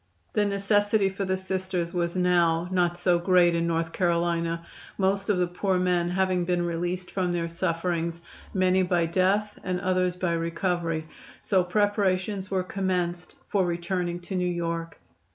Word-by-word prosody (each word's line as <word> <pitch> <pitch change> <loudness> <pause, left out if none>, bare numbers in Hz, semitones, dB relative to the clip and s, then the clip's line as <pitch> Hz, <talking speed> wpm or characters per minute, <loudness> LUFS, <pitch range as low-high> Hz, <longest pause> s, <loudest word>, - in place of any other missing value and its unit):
The 210 - +2
necessity 205 0 +2
for 195 +1 -3
the 190 0 0
Sisters 185 -2 -3
was 170 -1 -1
now 175 -2 +2
not 175 -1 +1
so 175 -1 +2
great 175 -1 +4
in 170 0 0
North 165 0 -1
Carolina 170 -1 0 0.3
most 195 +1 +1
of 205 - +3
the 180 - +2
poor 185 +2 -1
men 180 -1 +1
having 185 0 +1
been 175 0 0
released 175 +2 -3
from 185 -2 0
their 170 -1 -1
sufferings, 170 0 -2 0.3
many 185 0 +3
by 175 -2 +2
death 195 +5 +1
and 180 -1 -1
others 185 0 +1
by 180 -1 0
recovery 165 -1 -1 0.3
so 190 -3 +2
preparations 200 0 0
were 190 -1 0
commenced 180 -2 -2
for 200 -3 +1
returning 175 0 -2
to 190 +2 -6
New 180 -1 +1
York. 170 -1 -3
180 Hz, 155 wpm, -26 LUFS, 170-190 Hz, 0.3 s, great